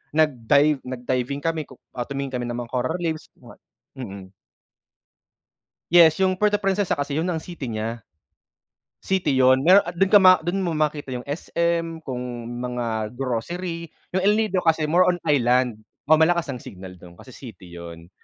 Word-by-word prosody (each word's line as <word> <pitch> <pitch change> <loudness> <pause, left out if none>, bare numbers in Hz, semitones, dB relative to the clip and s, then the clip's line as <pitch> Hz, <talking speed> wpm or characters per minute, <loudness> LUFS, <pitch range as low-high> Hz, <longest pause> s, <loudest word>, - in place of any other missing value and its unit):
nag-dive 145 0 +3
nag-diving 130 +2 -3
kami, 165 -2 -2
ku 130 - -14 0.2
ah, 120 -1 -5
tumingin 140 -1 -4
kami 120 - -4
ng 120 - -4
mga 120 -1 -6
coral 130 +6 -1
reefs, 160 -2 -3
mga - - -16 0.4
mm. 95 -5 -8 1.6
Yes, 170 0 +6
yung 185 -1 +1
Puerto 210 -1 +2
Princesa 195 0 0
kasi 145 +1 -3
yun 165 - -1
ang 160 -1 -4
city 170 -7 -7
nya. 110 0 -4 1.0
City 185 -7 0
yun. 130 0 +5
Meron 190 +2 +6
at 175 0 -6
dun 195 +2 +3
ka 205 - +9
ma 185 -1 +8
dun 180 +3 -1
mo 170 - -1
makita 150 -3 -2
yung 125 - -6
SM, 165 +2 -2
kung 125 -2 -4 0.4
mga 115 -3 -3
grocery. 165 +7 -4 0.2
Yung 185 - +1
El 205 - +5
Nido 205 -4 0
kasi 160 -2 +2
more 175 +4 +3
on 175 - +1
island. 125 -5 +2 0.3
Oh, 155 +2 +4
malakas 170 +1 +3
ang 125 - -8
signal 95 -1 -10
dun 85 -1 -14
kasi 130 - -14
city 100 -10 -12
yun. 85 0 -10
145 Hz, 170 wpm, -23 LUFS, 125-170 Hz, 1.6 s, ka